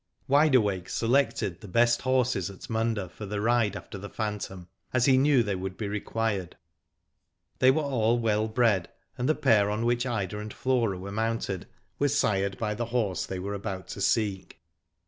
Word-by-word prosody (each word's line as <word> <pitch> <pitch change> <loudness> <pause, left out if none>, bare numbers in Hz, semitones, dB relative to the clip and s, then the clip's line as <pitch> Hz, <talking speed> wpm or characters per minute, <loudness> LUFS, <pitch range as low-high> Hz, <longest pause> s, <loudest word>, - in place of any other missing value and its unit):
Wide 145 +1 +4
Awake 100 -6 +1
selected 115 -7 +1
the 105 - -9
best 120 +4 +3
horses 125 -8 +1
at 100 - -10
Munda 110 -3 0
for 105 +4 -9
the 105 +1 -3
ride 110 -2 +2
after 100 - -8
the 100 +1 -8
phantom, 105 -4 -4 0.3
as 125 -2 +3
he 135 - +5
knew 135 -1 +4
they 105 -2 -1
would 95 0 -5
be 105 - -3
required. 105 -2 -2 1.0
They 130 - +6
were 155 +4 +3
all 120 -4 +2
well 110 -2 +1
bred, 110 -5 +2 0.3
and 125 +3 -1
the 155 - +3
pair 105 -2 +3
on 105 +2 -1
which 120 +2 +1
Ida 105 -4 -2
and 105 0 -6
Flora 120 -7 0
were 95 +2 -7
mounted, 110 -3 -2 0.3
were 145 - +3
sired 100 -8 +1
by 105 0 -1
the 120 +3 -3
horse 115 -6 -1
they 95 - -4
were 100 +2 -4
about 100 -2 -5
to - - -6
seek. 100 -4 0
110 Hz, 185 wpm, -28 LUFS, 100-120 Hz, 1.0 s, They